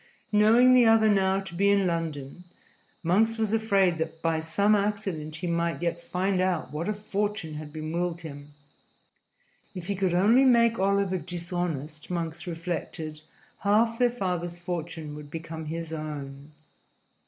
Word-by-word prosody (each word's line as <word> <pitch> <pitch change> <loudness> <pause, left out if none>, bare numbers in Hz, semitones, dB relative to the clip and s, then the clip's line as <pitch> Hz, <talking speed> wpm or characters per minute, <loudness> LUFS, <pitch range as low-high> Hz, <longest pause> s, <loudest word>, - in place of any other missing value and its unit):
Knowing 225 +4 +6
the 250 -1 +7
other 225 -1 +5
now 195 -2 +3
to 190 -2 -8
be 200 +4 +2
in 200 -1 +3
London, 165 -3 -3 0.6
Monks 220 +7 +2
was 220 -1 0
afraid 195 -6 +2
that 160 0 -3
by 165 -1 0
some 200 +7 +2
accident 200 -7 -1
he 170 +3 -5
might 170 -1 0
yet 170 0 -2
find 185 +1 0
out 185 -3 0
what 165 +6 -2
a - - +1
fortune 205 -4 -3
had 150 0 -7
been 155 0 -5
willed 175 0 -2
him. 145 -2 -9 1.2
If 180 -2 -6
he 200 +2 -2
could 185 -2 0
only 220 +9 +5
make 235 -4 +4
Oliver 195 -1 +1
dishonest, 170 -4 -4
Monks 170 0 -4
reflected, 165 -2 -5 0.4
half 225 +3 +2
their 245 -1 +5
father's 180 -7 -3
fortune 170 -3 -5
would 150 -1 -9
become 160 0 -6
his 165 +1 -5
own. 145 -2 -6
175 Hz, 155 wpm, -27 LUFS, 160-200 Hz, 1.2 s, the